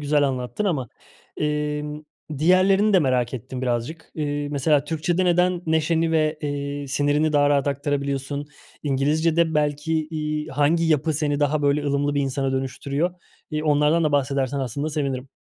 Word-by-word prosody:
güzel 145 0 +2
anlattın 130 +9 -3
ama, 145 - -1 0.5
emm, 150 0 -2 0.4
diğerlerini 190 +6 +4
de 190 - +6
merak 130 -5 +1
ettim 130 +2 -6
birazcık. 125 +7 -3
Eee, 145 -1 -2
mesela 145 0 +2
Türkçede 165 +4 0
neden 180 0 +2
neşeni 160 +1 +1
ve, 155 -1 +1
eee, 145 -1 -3
sinirini 145 +2 +1
daha 145 -1 +4
rahat 140 -1 +2
aktarabiliyorsun? 140 0 -2 0.4
İngilizcede 160 +4 +1
belki, 150 +1 0
iii, 150 -1 -3
hangi 150 +4 +2
yapı 155 0 +2
seni 145 -1 -1
daha 145 +1 +1
böyle 145 +1 +2
ılımlı 145 +1 0
bir 145 - +1
insana 135 0 -1
dönüştürüyor? 140 +5 -1 0.4
İii, 155 0 -2
onlardan 150 +2 +3
da 150 - +1
bahsedersen 140 -1 0
aslında 140 +4 -3
sevinirim. 135 -3 -2
145 Hz, 150 wpm, -23 LUFS, 140-160 Hz, 0.5 s, de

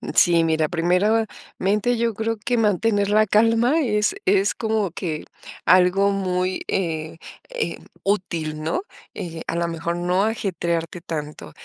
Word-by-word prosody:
Sí, 170 -2 +5
mira, 160 -1 +1
primeramente, 205 +4 0
yo 230 -1 0
creo 225 +1 -2
que 240 +4 -1
mantener 205 -1 +2
la 215 +1 +4
calma 230 +8 +3
es 210 - +1
es 195 -1 +3
como 220 -5 -1
que 160 -4 -4 0.4
algo 185 +3 +4
muy, 185 -1 -1
eh 160 -3 -2 0.3
eh, - - -3 0.2
útil, 170 -6 -1
¿no? 165 - -1 0.3
Eh, 165 -2 -6
a - - -2
lo 170 0 0
mejor 170 +1 -3
no 180 +3 +1
ajetrearte 170 -6 -2
tanto. 150 - -6
190 Hz, 135 wpm, -22 LUFS, 170-215 Hz, 0.4 s, Sí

